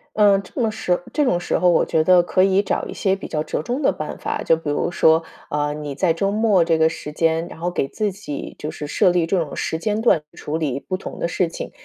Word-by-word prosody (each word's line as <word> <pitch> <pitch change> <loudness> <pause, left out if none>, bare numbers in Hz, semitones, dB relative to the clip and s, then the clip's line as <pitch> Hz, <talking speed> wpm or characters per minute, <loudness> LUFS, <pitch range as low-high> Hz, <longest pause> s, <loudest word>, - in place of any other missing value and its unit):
嗯， 205 -2 +5
这 190 - -9
么 230 -3 +2
时 180 -5 -1
这 300 - +2
种 180 -11 +2
时 - - -1
候， 180 - +3
我 175 - +3
觉 160 - +1
得 180 +1 +6
可 185 +1 +2
以 195 0 +4
找 205 - -2
一 - - -7
些 190 -1 +1
比 195 - -8
较 155 - -1
折 - - -3
中 250 - -2
的 - - +3
办 - - -6
法， - - -3
就 165 - +3
比 160 -2 -5
如 145 +4 -1
说， 160 -1 +4 0.3
呃， 150 0 -1
你 150 -2 -6
在 175 +3 +2
周 180 +5 0
末 210 -5 +3
这 165 -1 +2
个 160 0 +4
时 150 -2 -7
间， 165 +1 +1
然 - - -11
后 175 +2 -2
给 135 - -1
自 210 +4 -2
己 185 -7 -7
就 150 - -4
是 150 - -6
设 180 - +3
立 175 -2 +2
这 180 +3 +1
种 160 -4 -4
时 160 - -2
间 210 +5 -1
段， 225 -9 +4
处 150 +2 -4
理 140 -4 -2
不 185 - -3
同 - - -8
的 170 - -2
事 180 0 +1
情。 165 - -7
175 Hz, 290 characters per minute, -21 LUFS, 160-195 Hz, 0.3 s, 得